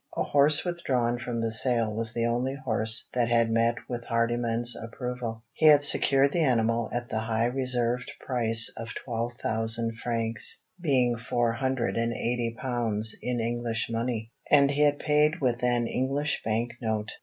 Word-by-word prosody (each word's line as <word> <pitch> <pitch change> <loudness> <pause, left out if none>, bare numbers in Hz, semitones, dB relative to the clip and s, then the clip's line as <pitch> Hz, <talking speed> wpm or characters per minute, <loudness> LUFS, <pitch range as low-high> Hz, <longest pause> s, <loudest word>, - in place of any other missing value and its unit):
A - - +1
horse 145 +3 +3
withdrawn 125 -9 -1
from 120 -1 -4
the 115 0 -1
sale 115 -1 +3
was 115 +1 -1
the 115 0 -1
only 120 +3 -1
horse 110 -4 -1
that 120 -2 +1
had 115 -1 +2
met 115 +1 +2
with 120 -1 -5
Hardyman's 115 0 0
approval. 115 -1 -6
He 155 - +3
had 145 -1 +7
secured 140 -1 +4
the 175 - +1
animal 115 -4 +1
at 120 0 -3
the 110 - -1
high 110 +1 0
reserved 125 -1 -1
price 115 -3 +2
of 115 -1 -7
twelve 120 -1 -3
thousand 115 0 -1
francs 115 -2 -1 0.2
being 125 -7 +2
four 115 +1 0
hundred 130 0 -1
and 115 0 0
eighty 115 0 -2
pounds 115 -4 -1
in 125 -1 -2
English 115 0 -2
money; 115 -1 -3 0.2
and 140 -1 +5
he 145 +1 -1
had 145 -1 +4
paid 150 +3 +2
with 125 -3 0
an 120 -1 +2
English 140 +5 -1
bank 115 +2 -1
note. 110 -1 -2
120 Hz, 165 wpm, -27 LUFS, 115-130 Hz, 0.2 s, had